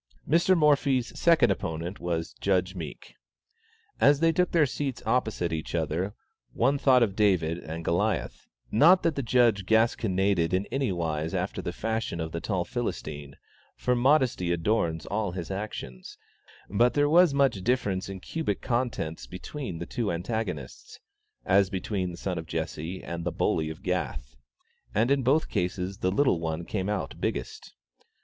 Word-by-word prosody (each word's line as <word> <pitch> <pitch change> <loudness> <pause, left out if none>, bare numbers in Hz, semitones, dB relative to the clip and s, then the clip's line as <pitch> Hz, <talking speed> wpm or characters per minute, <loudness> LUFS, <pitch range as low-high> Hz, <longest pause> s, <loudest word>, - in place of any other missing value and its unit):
Mr. 170 +4 +4
Morphy's 140 -5 +2
second 165 -10 +5
opponent 85 0 -4
was 85 -1 -3
Judge 95 -1 +1
Meek. 85 -5 -8 0.9
As 145 0 +5
they 165 +1 +4
took 180 +2 +1
their 165 -3 +4
seats 135 -1 -4
opposite 110 -9 0
each 80 +1 -4
other, 85 +5 -1 0.4
one 135 +4 +2
thought 130 -3 +5
of 100 -4 -1
David 90 -6 +2
and 80 0 -7
Goliath; 100 +4 -1 0.2
not 170 - +6
that 165 - +2
the 140 - -2
Judge 115 -4 +3
gasconaded 100 -6 +2
in 95 +2 0
any 135 -5 0
wise 80 -2 -2
after - - -2
the - - -3
fashion 110 -6 -3
of 80 -1 -3
the 85 - -4
tall 95 -4 -1
Philistine, 75 - -5 0.4
for 125 - +1
modesty 125 - +2
adorns 85 -2 0
all 100 -3 -2
his 90 0 -5
actions; 95 -11 -6 0.5
but 120 +4 +2
there 145 0 +3
was 175 +3 +6
as - - -5
much 135 -8 +2
difference 105 -6 0
in 95 -1 -6
cubic 105 - -3
contents 120 -10 -2
between 95 - -6
the 85 - -5
two 110 0 -2
antagonists, 90 - -4 0.5
as 95 0 +4
between 95 -1 -2
the 85 - -8
son 90 -3 -3
of 80 - -8
Jesse 80 +2 -4
and 85 0 -5
the 90 - -1
bully 80 -1 0
of 80 - -9
Gath, - - -3 0.6
and 115 +5 +2
in 140 -1 +3
both 140 +6 +2
cases 90 +2 -2
the 95 - +1
little 130 -5 +2
one 80 0 -3
came 95 0 -2
out 105 -2 -3
biggest. - - -4
100 Hz, 160 wpm, -27 LUFS, 85-125 Hz, 0.9 s, not